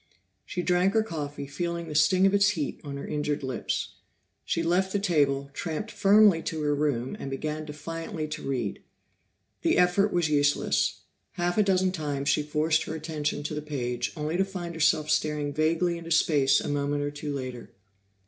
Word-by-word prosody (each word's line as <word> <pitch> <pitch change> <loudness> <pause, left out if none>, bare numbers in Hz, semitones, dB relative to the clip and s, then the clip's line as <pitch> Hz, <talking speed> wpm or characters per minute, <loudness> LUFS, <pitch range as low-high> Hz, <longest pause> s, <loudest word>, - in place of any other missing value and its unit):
She 180 - -3
drank 180 +3 +2
her 220 - +4
coffee, 145 -7 -5
feeling 170 +4 -3
the 155 - -6
sting 155 +6 +4
of 195 - +4
its 200 0 +5
heat 160 -9 -3
on 140 -2 -6
her 140 - -6
injured 150 -1 -2
lips. 130 -3 -3 0.5
She 165 - -1
left 180 +3 +1
the 205 - +1
table, 140 -7 +1
tramped 165 +8 -4
firmly 205 -3 +5
to 160 -2 -3
her 145 0 +2
room, 140 -4 -1
and 135 - -5
began 155 +3 -3
defiantly 155 +1 -5
to 155 - -5
read. 125 -7 -3 0.8
The - - +2
effort 180 +3 +3
was 175 -2 +2
useless; 145 -1 +1 0.3
half 175 +3 0
a - - +6
dozen 185 -1 +2
times 145 -5 -2
she - - +3
forced 150 +2 +1
her 160 - -4
attention 150 -2 -3
to 150 - -4
the 150 - -3
page 125 -5 -3
only 155 +3 -1
to 190 - +3
find 180 -3 -6
herself 155 -1 +2
staring 150 -2 0
vaguely 165 +3 +1
into 165 0 -9
space 145 -4 +4
a - - -4
moment 145 0 -1
or 145 - -2
two 145 0 -5
later. 130 -3 -5
155 Hz, 185 wpm, -27 LUFS, 145-175 Hz, 0.8 s, a